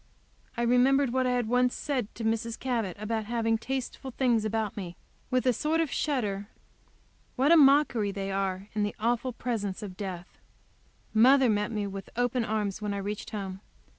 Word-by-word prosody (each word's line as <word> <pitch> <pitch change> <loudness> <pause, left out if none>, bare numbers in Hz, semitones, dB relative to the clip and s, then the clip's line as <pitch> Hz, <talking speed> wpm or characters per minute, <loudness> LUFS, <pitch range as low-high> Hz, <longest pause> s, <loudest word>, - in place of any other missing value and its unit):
I 235 - 0
remembered 250 +2 +3
what 260 -1 +2
I 250 - +1
had 245 -2 0
once 250 +1 +2
said 260 -7 -2
to 230 - -6
Mrs. 225 +1 -1
Cabot 230 -8 -2
about 220 0 -2
having 225 0 0
tasteful 265 +1 -4
things 240 -4 +1
about 220 -1 -1
me, 180 -5 -6 0.3
with 255 0 +1
a 250 - +4
sort 310 +7 0
of 325 -3 0
shudder. 210 -9 -1 0.9
What 275 +4 +3
a - - +9
mockery 275 -8 +5
they 195 0 -4
are 195 0 -2
in 215 - -1
the 205 0 -1
awful 240 +3 0
presence 220 -4 -3
of 190 -3 -7
death! 185 -2 -7 0.7
Mother 255 +2 +6
met 210 +1 0
me 210 -2 -2
with 195 -1 -7
open 245 0 +1
arms 215 -2 -2
when 205 -1 -2
I - - -2
reached 205 +1 -4
home. 195 -3 -5
225 Hz, 180 wpm, -28 LUFS, 205-250 Hz, 0.9 s, a